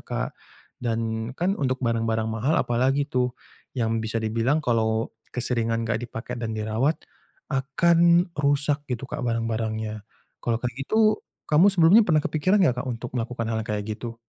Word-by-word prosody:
Kak - - -4 0.5
dan 115 -1 -2
kan 185 +3 +1
untuk 130 -2 0
barang-barang 115 -1 0
mahal 120 +8 +1
apalagi 130 +4 +1
tuh, 125 -2 0 0.4
yang 115 -2 0
bisa 110 0 -2
dibilang 115 +8 +1
kalau 110 -2 +1 0.2
keseringan 115 -2 0
enggak 115 0 0
dipake 115 0 -6
dan 115 -2 -3
dirawat 110 +8 0 0.6
akan 170 +5 +3
rusak 145 0 +1
gitu 125 -1 -2
kak 150 - -5
barang-barangnya. 110 -2 -2 0.4
Kalau 115 -1 0
kayak 125 -1 -2
gitu, 215 -1 +3 0.3
kamu 155 +5 +5
sebelumnya 190 +4 +6
pernah 155 -3 +3
kepikiran 185 +7 +2
enggak 125 -7 +2
Kak - - -10
untuk 120 0 -5
melakukan 115 0 -3
hal 110 - 0
yang - - -11
kayak 105 -1 -1
gitu? 115 +2 -5
120 Hz, 155 wpm, -25 LUFS, 115-145 Hz, 0.6 s, sebelumnya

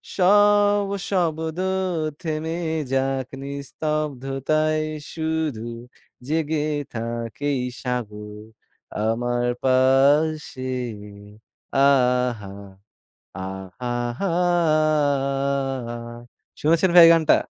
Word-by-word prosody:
সব 205 +1 +4 0.2
শব্দ 160 -3 -1 0.6
থেমে 160 +1 -3 0.4
যাক, 135 -1 0
নিস্তব্ধতায় 150 +1 -2 0.3
শুধু 160 -7 -2 0.6
জেগে 155 0 0 0.3
থাক। 115 -1 -4 0.2
এই 140 -2 0 0.2
সাগর 105 -4 -5 0.6
আমার 120 +2 0 0.2
পাশে। 135 +2 +3 1.1
আহা! 125 -6 +2 0.9
আহা 95 +4 -6 0.3
হা 200 - 0 2.3
শুনেছেন 165 +4 +3
ভাই 175 - +11
এই - - +8
গানটা? 160 -2 +4
140 Hz, 65 wpm, -23 LUFS, 125-160 Hz, 2.3 s, ভাই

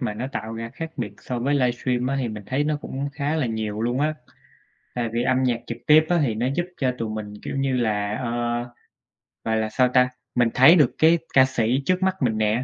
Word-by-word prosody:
mà 115 -5 -2
nó 125 +4 -4
tạo 110 -5 -5
ra 115 0 -6
khác 165 0 -5
biệt - - -4
so 125 -1 -4
với 140 +4 0
livestream 125 -1 0
á 135 - 0
thì 120 - -1
mình 105 -1 -7
thấy 135 +3 0
nó 150 0 0
cũng 140 +2 -4
khá 145 +2 -2
là 145 -6 0
nhiều 110 -1 -3
luôn 120 +3 0
á. 155 +1 +1 0.8
Tại 120 -2 -1
vì 120 - 0
âm 130 +1 +2
nhạc 120 -2 +1
trực 115 - -5
tiếp 155 +1 +7
á 175 -1 +3
thì 115 -6 0
nó 120 +3 -1
giúp 175 +1 0
cho 130 -2 0
tụi 115 -1 -3
mình, 105 -1 -6
kiểu - - -5
như 135 -1 0
là, 105 -3 0
ờ, 120 - -2 1.1
gọi 110 0 0
là 110 0 -1
sao 125 +3 +3
ta? 125 0 +3 0.3
Mình 120 -2 +3
thấy 130 +7 +7
được 150 -8 +3
cái 165 +2 +5 0.2
ca 130 -1 +7
sĩ 130 +1 0
trước 185 0 +1
mắt 190 0 +2
mình 110 -4 +1
nè, 110 +3 +1
125 Hz, 240 wpm, -23 LUFS, 115-140 Hz, 1.1 s, tiếp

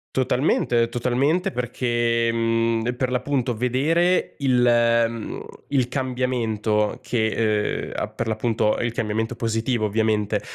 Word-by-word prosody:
Totalmente, 125 -2 +1
totalmente, 130 +9 0
perché, 120 -1 0
mhmm, 115 +1 0
per 125 0 -1
l'appunto 130 -1 0
vedere 150 +10 +1
il 125 -3 +2
ehm, 115 -1 +1 0.2
il 130 -4 0
cambiamento 120 -5 -1
che 110 -2 0
ehm, - - -9
a - - -2
per 115 - -5
l'appunto 110 -1 0
il 120 -1 -1
cambiamento 110 +1 -2
positivo 115 0 -1
ovviamente, 105 -1 0
120 Hz, 115 wpm, -23 LUFS, 110-125 Hz, 0.2 s, il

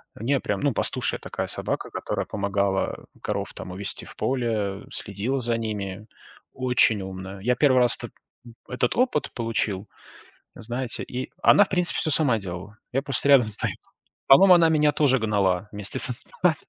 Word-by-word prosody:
У - - -10
неё 135 +3 +1
прям, - - -2
ну, 140 -2 +1
пастушья - - -1
такая - - -5
собака, - - -4
которая - - -3
помогала 100 -1 -1 0.2
коров - - -3
там 90 - -8
увести 95 +2 -3
в - - -13
поле, 110 -6 -2
следила 105 +7 -3
за 120 -2 -1
ними. 105 -2 -5 0.5
Очень 125 -4 +2
умная. 95 +1 -7
Я 125 +6 +1
1 130 0 +3
раз 125 -1 +3 0.7
этот 125 -1 -1
опыт 245 - +1
получил, 110 -4 -2 0.7
знаете, 120 +2 -5
и 125 +1 -6
она, 205 - +7
в - - -13
принципе, 180 -2 +1
всё 155 - -1
сама 140 -7 +3
делала. 95 +2 -8 0.2
Я 135 +2 0
просто 140 0 -1
рядом 125 -6 +5
стою. - - +1 0.5
По-моему, 185 +8 +8
она 165 -2 +5
меня 150 -2 +3
тоже 140 -3 +2
гнала 100 -3 0
вместе 105 +4 -4
со 125 - +5
стадом. 165 +7 +2
115 Hz, 160 wpm, -24 LUFS, 100-135 Hz, 0.7 s, По-моему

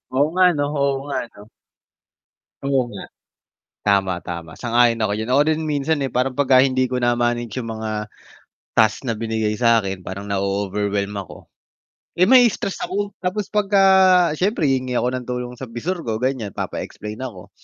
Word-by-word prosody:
Oo 140 +3 +4
nga 185 +2 +3
ano 150 -5 0 0.2
oo 140 0 +2
nga 145 - -4
ano. 105 -3 -16 1.2
Oo 135 -3 +1
nga, 100 -3 -8 0.8
tama, 95 -3 +1
tama, 85 -2 -7
sang-ayon 120 -1 +3
ako 100 - 0
diyan, 110 - -4
ako 130 +3 +4
rin 155 0 +1
minsan 145 +1 0
eh, 135 - -1
parang 130 +2 0
pagka 130 -1 +4
hindi 130 -1 +1
ko 125 - -2
na-manage 120 -1 0
yung 115 -2 -5
mga 110 -1 -4 0.7
task 110 -1 +3
na 115 -5 -3
binigay 110 -1 -1
sa'kin 115 -5 +2
parang 100 +2 -6
na-o-overwhelm 100 +1 -1
ako, 95 - -10 0.6
eh, 175 - 0
ma-i-stress 245 -6 +4
ako 205 +1 -4
tapos 190 +2 -3
pagka 200 -1 +2 0.6
siyempre 200 0 0
hihingi 130 -1 -1
ako 125 - +1
ng 125 -1 -5
tulong 125 0 -4
sa 130 - -6
visor 130 +11 -4
ko, 110 0 -2
ganyan 125 -6 -2
papa-explain 105 +1 -6
ako, 120 -9 -8
120 Hz, 160 wpm, -21 LUFS, 105-140 Hz, 1.2 s, Oo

